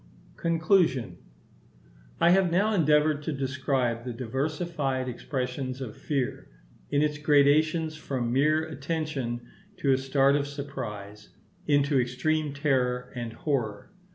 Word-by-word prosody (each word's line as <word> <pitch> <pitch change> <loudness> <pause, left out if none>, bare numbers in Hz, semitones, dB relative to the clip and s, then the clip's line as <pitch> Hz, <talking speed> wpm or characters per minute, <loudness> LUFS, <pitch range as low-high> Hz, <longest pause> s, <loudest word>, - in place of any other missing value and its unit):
Conclusion.—I 90 - -1
have 190 -1 +4
now 205 +5 +2
endeavoured 150 -4 +3
to 155 - -3
describe 130 -3 -1
the 125 -1 -5
diversified 135 +2 -2
expressions 130 +1 -4
of 125 -5 -6
fear, 135 -4 -3 0.4
in 145 +1 +2
its 150 -1 -1
gradations 155 +2 +3
from 130 -6 -3
mere 155 +4 +3
attention 150 -5 -3 0.4
to 140 - +1
a 130 - +3
start 135 +1 +3
of 145 -1 0
surprise, 105 -8 -7 0.4
into 145 -1 +3
extreme 145 +5 -1
terror 130 -4 0
and 120 -2 -4
horror. 115 - -2
140 Hz, 115 wpm, -27 LUFS, 125-155 Hz, 0.4 s, have